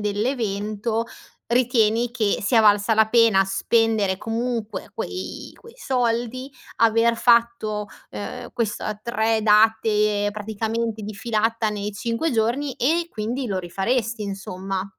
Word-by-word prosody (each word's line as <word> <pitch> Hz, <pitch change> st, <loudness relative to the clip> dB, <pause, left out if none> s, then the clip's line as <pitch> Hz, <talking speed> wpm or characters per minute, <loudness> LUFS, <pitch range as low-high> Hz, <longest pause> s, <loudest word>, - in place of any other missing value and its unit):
dell'evento, 215 Hz, 0 st, -1 dB, 0.4 s
ritieni 235 Hz, -1 st, +2 dB
che 220 Hz, -4 st, 0 dB
sia 225 Hz, +2 st, +3 dB
valsa 210 Hz, +1 st, +4 dB
la 220 Hz, 0 st, +4 dB
pena 225 Hz, -4 st, +5 dB
spendere, 210 Hz, 0 st, +1 dB
comunque 225 Hz, 0 st, -3 dB
quei 375 Hz, -1 st, -6 dB
quei 465 Hz, -, -16 dB
soldi, 250 Hz, -, -1 dB, 0.3 s
aver 230 Hz, +1 st, +3 dB
fatto, 230 Hz, -3 st, +2 dB, 0.2 s
ehm, -, -, -6 dB
questa 215 Hz, -2 st, -2 dB
3 225 Hz, -1 st, 0 dB
date, 210 Hz, -1 st, +3 dB
praticamente, 220 Hz, +1 st, -3 dB
di 210 Hz, +1 st, -6 dB
filata 225 Hz, +1 st, 0 dB
nei 210 Hz, 0 st, -4 dB
5 230 Hz, +9 st, -2 dB
giorni 240 Hz, +5 st, 0 dB
e 330 Hz, +7 st, +1 dB
quindi, 240 Hz, +3 st, -3 dB
lo 195 Hz, -3 st, -2 dB
rifaresti 220 Hz, +5 st, -1 dB
insomma? 195 Hz, -1 st, -4 dB
220 Hz, 115 wpm, -23 LUFS, 210-235 Hz, 0.4 s, pena